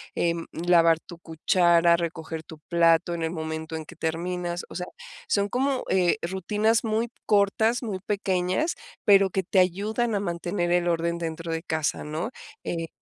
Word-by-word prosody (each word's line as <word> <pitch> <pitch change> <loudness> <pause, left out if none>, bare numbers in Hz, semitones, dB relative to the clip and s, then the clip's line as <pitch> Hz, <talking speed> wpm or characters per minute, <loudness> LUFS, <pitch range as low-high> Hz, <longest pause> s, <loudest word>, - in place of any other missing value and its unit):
em, 170 -1 0
lavar 165 -1 +4
tu 175 -2 -12
cuchara, 170 +1 +3
recoger 160 -1 -4
tu 155 -1 -12
plato 170 0 +3
en 170 -1 -3
el 160 - -1
momento 160 -1 -4
en 160 - -4
que 170 +2 -14
terminas. 175 +2 -2
O - - -10
sea, 180 0 -4 0.4
son 200 0 +1
como, 265 +2 0
eh, 180 +1 +3
rutinas 210 +6 +1
muy 225 +2 0 0.2
cortas, 220 +4 +2
muy 200 -5 -3
pequeñas, 195 - 0 0.3
pero 195 -1 +6
que 190 +1 -1
te 190 +2 +2
ayudan 210 +6 +1
a 200 - 0
mantener 175 -1 -2
el 175 0 +3
orden 170 0 0
dentro 165 0 -4
de 165 0 -3
casa, 160 -3 -1
¿no? 155 +9 -3 0.3
Eh, 165 -1 -3
175 Hz, 165 wpm, -26 LUFS, 165-200 Hz, 0.4 s, pero